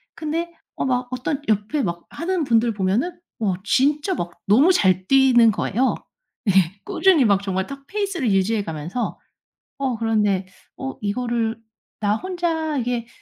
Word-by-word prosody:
근데 330 +2 -3 0.2
어 - - -2
막 250 -1 0
어떤 255 +3 -2
옆에 215 +7 0
막 170 -2 -3
하는 345 +2 -2
분들 235 -3 +2
보면은 215 - -1 0.2
와 200 -5 0
진짜 290 - +2
막 175 - -4 0.2
너무 260 - +6
잘 185 - +2
뛰는 255 -4 +6
거예요. 240 +5 0 0.5
예. - - +4 0.3
꾸준히 360 -9 +4
막 200 -2 +3
정말 190 -1 -2
탁 275 0 -9
페이스를 390 - -1
유지해 200 +2 +1
가면서 165 +7 -4 0.6
어 270 -3 -1
그런데 210 -4 +1 0.3
'어 265 0 -5
이거를 230 +1 -1 0.4
나 210 -1 +1
혼자 325 -1 -2
이게, 240 -2 -2
240 Hz, 270 characters per minute, -22 LUFS, 205-295 Hz, 0.6 s, 너무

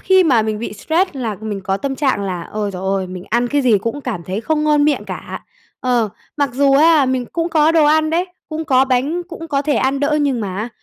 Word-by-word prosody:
khi 375 -1 +4
mà 245 -8 +4
mình 215 -1 -2
bị 230 - -5
stress 330 - 0
là 235 -7 -4
mình 210 -2 -4
có 195 0 -1
tâm 275 +6 -3
trạng 265 -8 0
là, 185 -3 -3
ôi 210 -1 -2
giời 185 -1 -7
ơi, 190 -1 -1
mình 180 0 -8
ăn 240 +2 +1
cái 285 +3 +1
gì 225 -5 +4
cũng 230 +8 -4
cảm 230 -10 -4
thấy 185 +5 -4
không 305 +4 0
ngon 295 -1 +3
miệng 300 - +1
cả. - - -7 0.4
Ờ, 245 -3 +1 0.3
mặc 285 -2 +1
dù 275 +2 +3
á, 300 0 +5
mình 255 -1 0
cũng 335 0 -1
có 315 -1 +3
đồ 320 -2 +4
ăn 310 +1 +3
đấy, 345 +3 +1 0.2
cũng 315 +1 -4
có 265 -3 +4
bánh, 275 +7 0
cũng 330 -1 -8
có 280 -2 0
thể 295 0 0
ăn 270 +1 0
đỡ 300 +1 +1
nhưng 275 -5 0
mà 190 -2 -4
á, 220 +4 -3
270 Hz, 255 wpm, -18 LUFS, 215-305 Hz, 0.4 s, á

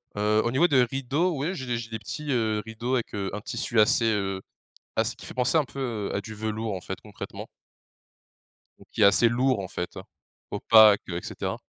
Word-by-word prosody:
Heu, 105 +1 +2
au 120 - 0
niveau 160 +7 +4
des 130 -5 +4
rideaux, 135 +8 0
oui 160 +8 -2
j'ai 130 -7 -6
des 120 -1 -1
j'ai 115 0 -7
des 110 -1 -5
petits, 145 +7 -5
heu, 110 -3 +1
rideaux 115 +3 -2
avec, 120 - -3
heu, 100 -2 -2
un 105 - -4
tissu 115 -1 -1
assez, 110 +2 +4
heu, 100 -3 0 0.6
ass - - +1
qui - - -13
fait - - -8
penser 125 +5 +1
un 150 - +2
peu 120 -6 -4
à 100 - 0
du 110 +2 -9
velours 110 0 -3
en 90 - -5
fait, 95 +1 -6
concrètement. 105 -2 -8 1.3
Donc - - -18
qui - - -3
est - - +8
assez 100 +4 +6
lourd 125 -1 +1
en 95 - -4
fait, 90 0 -4 0.6
opaque 110 -2 +6
et 85 0 -3
cetera. - - -4
115 Hz, 210 wpm, -26 LUFS, 105-130 Hz, 1.3 s, est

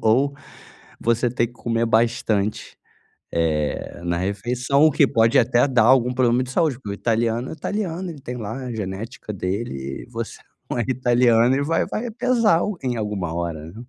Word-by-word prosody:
ou 135 +6 +2 0.6
você 120 +1 +1
ter 120 0 0
que 120 - -19
comer 115 -1 -1
bastante, 110 -2 0 0.5
eh, 80 0 -1
na 85 0 -1
refeição 125 - +2
que 145 0 +4
pode 115 -1 +3
até 125 +2 +3
dar 125 -3 +3
algum 125 -1 +4
problema 125 0 +2
de 125 - -7
saúde, 155 -2 +1
porque 115 -5 -9
o - - -2
italiano 115 +3 0
é - - -5
italiano 185 +2 -3
ele 160 -4 -8
tem 125 -1 -6
lá 110 -1 -5
a 125 - -4
genética 105 +2 -5
dele, 90 - -4
eh, - - -21
você 115 -1 -5 0.3
não - - -2
é 120 - +1
italiano 120 -1 +3
e 140 - 0
vai 165 +3 +1
vai 240 +3 -4
pesar 230 -6 +3
algo 210 +1 -2
em 125 -2 -1
alguma 105 -6 -3
hora. 85 -1 -4
120 Hz, 175 wpm, -22 LUFS, 105-130 Hz, 0.6 s, que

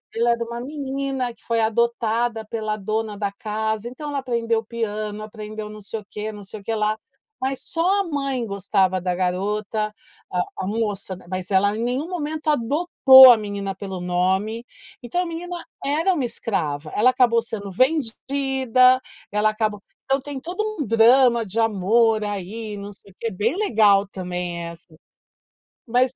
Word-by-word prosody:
ela 235 +1 +3
era 235 0 0
uma 235 +1 -6
menina 270 -2 -3
que - - -28
foi 230 -1 0
adotada 230 0 +1
pela 215 -1 -3
dona 215 +1 -2
da 200 -1 -2
casa, 220 +2 -3
então 295 +4 -7
ela 285 - -2
aprendeu 230 -3 0
piano, 215 -2 -4
aprendeu 215 0 -7
não 215 - -9
sei 220 +2 -5
o 205 - -15
quê, 215 +1 -5
não 205 -1 -10
sei 205 +2 -9
o - - -20
quê 225 - -2
lá, 215 0 0 0.4
mas 265 0 -1
só 365 +4 +1
a - - -1
mãe 275 -5 -2
gostava 195 -2 +1
da 180 0 -1
garota, 205 +4 -1 0.4
a 180 -1 +1 0.2
a - - -3
moça, 205 -3 -2
ma 180 - -16
mas 185 +1 -4
ela 200 +2 +3
em 230 - -2
nenhum 260 +8 -1
momento 310 -3 -3
adotou 265 -1 +7
a 230 - +6
menina 200 -2 -4
pelo 190 -1 -6
nome, 190 +6 0 0.4
então 245 +9 -1
a - - -2
menina 345 +1 -6 0.2
era 320 +7 +2
uma 280 -6 0
escrava, 155 -11 -2
ela 250 +4 +5
acabou 245 -2 +4
sendo 215 -4 -5
vendida, 260 - +2 0.3
ela 210 +1 +3
acabou 215 -1 -1 0.3
então 270 +1 +1
tem 285 0 -6
todo 355 +8 -4 0.2
um 295 - 0
drama 235 +1 +5
de 210 +3 -3
amor 225 +1 +3
aí, 205 +2 -5
não 200 +1 -7
sei 200 - -13
o - - -26
quê, 230 - -2
bem 220 - 0
legal 210 - +4
também 180 -2 -4
essa, 170 0 -9 1.0
mas 250 +2 +2
225 Hz, 170 wpm, -23 LUFS, 205-255 Hz, 1.0 s, adotou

